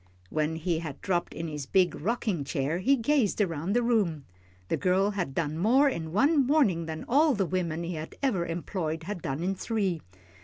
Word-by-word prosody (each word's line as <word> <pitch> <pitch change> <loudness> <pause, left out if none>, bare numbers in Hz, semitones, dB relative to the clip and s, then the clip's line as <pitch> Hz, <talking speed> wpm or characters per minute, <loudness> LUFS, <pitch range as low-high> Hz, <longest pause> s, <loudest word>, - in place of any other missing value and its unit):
When 155 +1 0
he 165 0 -1
had 155 -5 -6
dropped 175 -2 -1
in 165 - -5
his 150 -3 -5
big 185 -2 +3
rocking 210 -3 -1
chair, 140 +4 -1
he 270 +9 +4
gazed 250 -3 +1
around 170 -2 0
the 240 +1 +2
room. 195 - +1 0.4
The - - +1
girl 190 +2 +2
had 175 -9 -3
done 155 -1 -1
more 255 +10 +4
in 165 - -2
one 275 - +3
morning 210 - +2
than 160 0 -5
all 290 +2 +4
the 195 -2 +1
women 170 -2 -2
he 170 +1 -3
had 155 0 -6
ever 195 -11 +1
employed 165 -1 -3
had 185 0 -5
done 140 +4 -3
in 190 +2 0
three. 195 -5 -1
180 Hz, 195 wpm, -28 LUFS, 160-215 Hz, 0.4 s, he